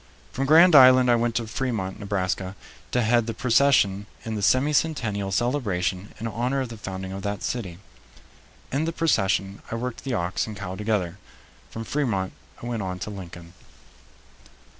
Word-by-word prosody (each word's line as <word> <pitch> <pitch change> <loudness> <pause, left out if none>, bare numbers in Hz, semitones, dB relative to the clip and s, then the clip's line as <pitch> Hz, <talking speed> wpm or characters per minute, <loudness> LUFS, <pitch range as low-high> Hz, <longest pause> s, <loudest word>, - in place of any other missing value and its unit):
From 135 +1 -2
Grand 165 +4 +7
Island 130 -2 +8
I - - +5
went 120 -1 0
to 115 0 0
Fremont, 110 -5 -3
Nebraska, 95 -2 -2 0.3
to 125 - +1
head 120 0 +2
the 115 - -3
procession 115 -5 +3 0.2
in 110 - -3
the 105 - -3
semi 130 +8 +3
centennial 115 -11 0
celebration 100 -5 -1
in 115 - -5
honor 120 +5 -1
of 130 - -4
the 115 - -8
founding 95 -2 -6
of 95 0 -5
that 100 0 -4
city. 95 -9 -3 0.9
In 145 +4 0
the 165 - -2
procession 100 - 0
I - - -3
worked 125 +1 -5
the 130 -3 -2
ox 90 +1 -1
and 105 -1 -7
cow 90 - -5
together. 100 -3 -2 0.5
From 115 - -6
Fremont 110 -8 -1 0.3
I - - -5
went 120 -2 -3
on 90 -1 -4
to 105 - -6
Lincoln. 85 -3 -10
110 Hz, 170 wpm, -25 LUFS, 95-125 Hz, 0.9 s, Island